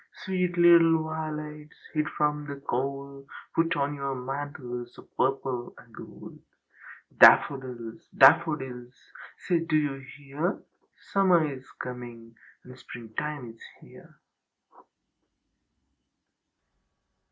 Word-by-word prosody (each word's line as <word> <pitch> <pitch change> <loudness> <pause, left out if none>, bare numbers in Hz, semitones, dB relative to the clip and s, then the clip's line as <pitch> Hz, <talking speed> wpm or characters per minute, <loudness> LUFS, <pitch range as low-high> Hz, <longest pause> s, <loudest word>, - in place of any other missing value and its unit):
Sweet 180 -2 -1
little 165 -2 +6
violets 155 -1 -6 0.2
hid 150 -1 0
from 150 0 -1
the 140 - -5
cold, 140 +1 -4 0.3
Put 165 +1 +1
on 145 0 -1
your 140 -1 -3
mantles 125 -2 -6
of - - -17
purple 130 -2 -1
and - - -18
gold! - - -12 0.8
Daffodils! 125 -5 +4
Daffodils! 130 -3 +4 0.4
Say, 175 -3 0
do 165 -1 -1
you 145 -3 -1 0.2
hear? 145 +6 -3 0.5
Summer 185 -5 +4
is 130 -1 -12
coming 120 -2 -8 0.3
and 125 0 -13
springtime 125 +5 -6
is 115 - -21 0.2
here." - - -17
140 Hz, 95 wpm, -27 LUFS, 125-155 Hz, 0.8 s, little